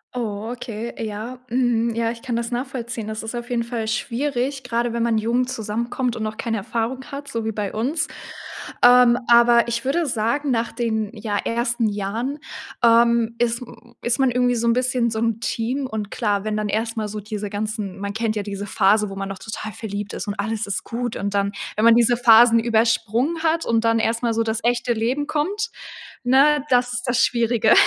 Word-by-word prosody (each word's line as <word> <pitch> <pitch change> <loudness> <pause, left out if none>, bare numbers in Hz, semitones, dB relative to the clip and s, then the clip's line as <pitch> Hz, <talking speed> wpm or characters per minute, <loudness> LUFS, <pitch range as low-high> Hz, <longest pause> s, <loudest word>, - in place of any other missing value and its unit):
Oh, 220 -2 -3
okay, 235 -1 -6
ja. 220 +4 -6
Mhm. 235 -1 +1
Ja, 230 0 0
ich 230 0 -9
kann 245 -2 -3
das 235 0 -2
nachvollziehen. 240 -3 -4
Das 220 0 -5
ist 225 +2 -5
auf 240 +1 -6
jeden 240 -1 0
Fall 230 -2 -4
schwierig, 265 +4 -2
gerade 240 -1 -1
wenn 235 0 0
man 230 -1 +2
jung 235 +3 +1
zusammenkommt 235 +2 -2
und 220 - -4
noch 215 0 -4
keine 225 -1 -2
Erfahrung 230 +5 -3
hat, 280 +1 -6
so 230 -5 -3
wie 220 - 0
bei 205 -2 -3
uns. 270 +9 -1 0.8
Ähm, 245 -1 +7
aber 235 0 +6
ich 235 0 -2
würde 330 +5 +1
sagen, 250 +3 0
nach 235 -1 0
den, 220 -3 -1
ja, 210 -2 -3
ersten 235 0 0
Jahren, 220 +8 -3 0.4
ähm, 235 0 +4
ist 235 0 0
m 240 -1 -13
ist 240 +1 0
man 265 -2 +3
irgendwie 245 0 +2
so 235 0 0
'n 230 - +4
bisschen 250 -1 +1
so 220 - -2
'n 230 -1 0
Team 240 +5 -2
und 215 -4 -4
klar, 205 -4 0
wenn 215 0 -1
dann 210 -1 -2
erst 225 +2 -1
mal 215 -1 -1
so 210 +1 -5
diese 210 0 -5
ganzen 210 -2 -4
man 200 0 -4
kennt 220 0 -1
ja 210 - -2
diese 200 0 -5
Phase, 210 +2 +3
wo 195 - -7
man 195 0 -4
doch 195 -1 -6
total 215 -1 -6
verliebt 205 0 -5
ist - - -5
und 205 - -2
alles 220 +1 -2
ist 200 - -3
gut 240 0 -4
und 200 0 -3
dann, 200 0 +1 0.3
wenn 215 - +2
man 230 0 +8
diese 240 0 +4
Phasen 230 0 +7
übersprungen 230 +6 +1
hat 325 0 +1
und 230 -1 +1
dann 230 0 +3
erst 230 +1 0
mal 235 -1 +2
so 230 +1 +1
das 225 0 -1
echte 240 0 +1
Leben 245 +6 -1
kommt, 400 +10 -1 0.5
ne, 275 +3 +4
das 245 -1 +2
ist 245 0 -3
das 245 +1 +2
Schwierige. 230 -2 +3
230 Hz, 210 wpm, -22 LUFS, 220-245 Hz, 0.8 s, man